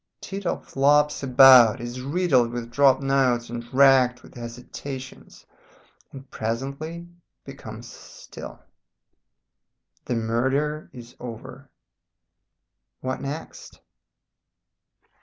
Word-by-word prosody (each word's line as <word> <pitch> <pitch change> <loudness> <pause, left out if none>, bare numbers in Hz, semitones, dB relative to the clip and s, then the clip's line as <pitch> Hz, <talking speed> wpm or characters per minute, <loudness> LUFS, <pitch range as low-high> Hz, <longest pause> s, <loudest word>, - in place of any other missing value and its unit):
Tito 195 -2 -4
flops 145 +2 +1
about, 130 -4 +7
is 120 +2 -6
riddled 140 -4 +1
with 120 -1 -6
dropped 135 +1 +3
notes 130 -4 +1
and 120 0 -7
racked 130 -2 +4
with - - -16
hesitations, 125 +3 -9 0.7
and 135 0 -11
presently 140 +9 -5 0.4
becomes - - -10
still. - - -12 1.4
The 125 - -2
murder 130 +7 -1
is 120 -1 -13
over. 115 -3 -10 1.3
"What 130 0 -4
next? 140 +3 -8
130 Hz, 85 wpm, -24 LUFS, 120-140 Hz, 1.4 s, about